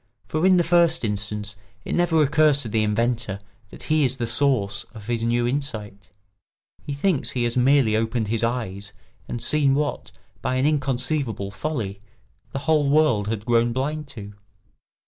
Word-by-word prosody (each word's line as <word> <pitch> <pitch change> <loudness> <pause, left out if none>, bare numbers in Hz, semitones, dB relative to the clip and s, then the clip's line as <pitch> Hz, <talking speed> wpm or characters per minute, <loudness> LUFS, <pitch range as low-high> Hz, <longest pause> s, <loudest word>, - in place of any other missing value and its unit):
For 155 +4 +1
in 185 -1 +5
the 175 - +3
first 170 -4 +3
instance 105 0 -3 0.3
it - - -3
never 165 -3 +3
occurs 150 0 +3
to - - -5
the 110 0 0
inventor 110 -1 -1 0.3
that - - -12
he 155 -1 +2
is 130 0 +1
the 120 - -2
source 115 -5 +2
of 105 -2 -10
his 115 0 -2
new 120 +1 +1
insight; 110 -7 -4 0.7
he 145 - -5
thinks 155 0 +1
he 125 - -1
has 120 0 -1
merely 130 -3 +3
opened 110 0 -1
his 115 0 0
eyes 110 -5 -3 0.3
and 120 - -4
seen 140 +1 +2
what, 145 -6 -2 0.3
by 130 +1 -1
an 130 +1 +1
inconceivable 130 -7 -1
folly, 105 -4 -4 0.5
the 135 - -3
whole 150 -2 +3
world 140 -9 +3
had 110 -1 -3
grown 120 0 +2
blind 150 +4 -3
to. 105 -7 -9
125 Hz, 165 wpm, -23 LUFS, 110-145 Hz, 0.7 s, in